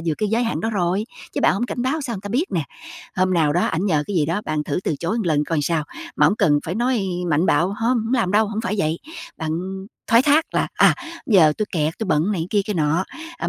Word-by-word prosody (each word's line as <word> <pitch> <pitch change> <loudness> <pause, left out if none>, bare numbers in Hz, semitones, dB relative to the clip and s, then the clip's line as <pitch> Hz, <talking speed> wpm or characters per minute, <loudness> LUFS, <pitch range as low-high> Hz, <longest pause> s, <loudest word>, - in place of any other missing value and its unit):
vượt 160 - +1
cái 215 - 0
giới 230 +3 +1
hạn 230 - -2
đó 225 - -1
rồi, 190 0 0 0.3
chứ - - -2
bạn - - +4
hổng 245 - -1
cảnh 245 - -3
báo 270 +5 0
sao 250 -5 -4
người - - -7
ta 205 - -6
biết 255 - +1
nè. 165 -4 +1 0.5
Hôm 185 0 +2
nào 155 -3 +3
đó 175 - +2
ảnh 175 +5 -1
nhờ 155 -6 +2
cái 200 - -3
gì 150 - +2
đó, 170 +6 -1
bạn 155 -1 -2
thử - - -2
từ - - 0
chối 185 +7 -1
một 220 - -1
lần 150 -3 +2
coi 165 +1 -1
sao? 155 0 0 0.3
Mà - - +5
hổng 210 - +2
cần 145 -2 +3
phải 170 - -2
nói 240 -2 0 0.3
mạnh 155 +5 +2
bạo: 175 - +3
"Hông, 235 +2 +1
hổng 225 +3 -1
làm 225 -7 +1
đâu," 215 +1 +4
hổng 215 +1 -3
phải 230 -2 -2
vậy. 160 -1 0 0.4
Bạn 160 -2 -3 0.6
thoái 230 +1 +5
thác 295 +3 +4
là: - - +1
"À, - - +5 0.3
giờ 175 -9 +5
tui 215 - 0
kẹt, 155 -1 -1
tui 220 - -2
bận 165 +5 +1
này 170 -4 -2
kia 205 - +3
kia 210 -1 -3
nọ, 160 +3 +1 0.3
ờ, - - -2
190 Hz, 270 wpm, -21 LUFS, 160-225 Hz, 0.6 s, Mà